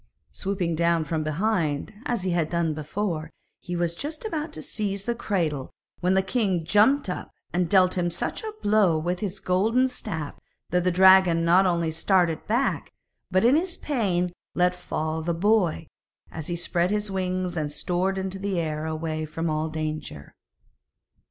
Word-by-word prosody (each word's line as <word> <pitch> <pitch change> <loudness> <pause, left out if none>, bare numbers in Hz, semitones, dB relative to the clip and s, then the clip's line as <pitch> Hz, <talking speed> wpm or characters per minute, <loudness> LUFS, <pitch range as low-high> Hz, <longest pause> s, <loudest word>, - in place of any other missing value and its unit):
Swooping 190 -3 -2
down 170 0 +2
from 155 +1 -2
behind 155 -1 -1
as 235 -6 -1
he 185 - 0
had 170 -3 +1
done 170 -2 0
before, 160 +1 -3 0.3
he 175 -1 -5
was 170 -1 0
just 300 - -6
about 320 -6 -3
to - - -5
seize 200 -2 -3
the 235 - -1
cradle, 165 - -2 0.3
when 185 +2 +2
the 190 - +3
king 190 -6 0
jumped 215 - +4
up 180 - -4 0.2
and 175 -1 +1
dealt 185 -1 +4
him 175 0 +1
such 170 - -3
a 435 - -4
blow 205 -6 +4
with 175 +3 -2
his 195 -1 -3
golden 220 +9 +2
staff 180 - -5 0.4
that 180 0 +2
the - - +4
dragon 185 -2 +6
not 185 +3 +5
only 170 -2 +1
started 170 0 +1
back, 240 +5 0 0.4
but 185 +4 +2
in 250 +4 +6
his 350 +3 0
pain 190 -11 0 0.2
let 180 0 +3
fall 160 -3 -3
the 170 +1 -1
boy, 185 -3 +2 0.5
as 160 -2 -6
he 175 - -2
spread 175 +1 0
his 210 0 -1
wings 185 -1 -1
and 150 -3 -2
soared 180 +5 -1
into 190 0 -3
the 195 -2 -1
air 155 -1 -2
away 155 0 -3
from 160 +1 -3
all 155 +1 -1
danger. 155 - -5
180 Hz, 170 wpm, -25 LUFS, 160-200 Hz, 0.5 s, dragon